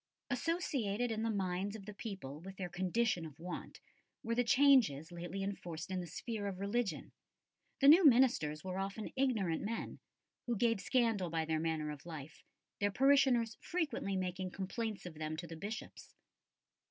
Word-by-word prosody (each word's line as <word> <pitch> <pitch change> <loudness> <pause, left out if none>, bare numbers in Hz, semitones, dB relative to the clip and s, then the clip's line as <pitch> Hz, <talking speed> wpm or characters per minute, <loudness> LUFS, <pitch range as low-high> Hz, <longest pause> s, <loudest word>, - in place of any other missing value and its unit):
Associated 245 - 0
in 220 0 -1
the 225 - 0
minds 195 0 -1
of 205 -3 -9
the 210 - -7
people 190 - -6
with 190 +2 -9
their 180 -2 -4
condition 185 +1 0
of 155 -3 -9
want 175 +2 -6 0.4
were 230 - -1
the 245 +1 +3
changes 245 - +4
lately 175 +3 -4
enforced 175 -4 -5
in 185 - -1
the 175 - -5
sphere 210 +5 -4
of 190 -2 -4
religion. 200 +2 -1 0.7
The 275 - +6
new 330 +6 +9
ministers 235 - +4
were 185 0 -3
often 195 +3 -4
ignorant 220 -11 +1
men, 225 +3 -4 0.5
who 240 -2 0
gave 230 -2 +2
scandal 225 -6 +1
by 160 -1 -1
their 160 0 0
manner 155 -2 -1
of 150 +2 -9
life, 155 -2 -8 0.4
their 205 - +2
parishioners 260 -2 +4
frequently 305 - -1
making 185 0 -2
complaints 205 +3 -4
of 175 - -6
them 155 0 -4
to 170 - -5
the 165 0 -8
Bishops. 210 - -7
195 Hz, 165 wpm, -35 LUFS, 175-235 Hz, 0.7 s, new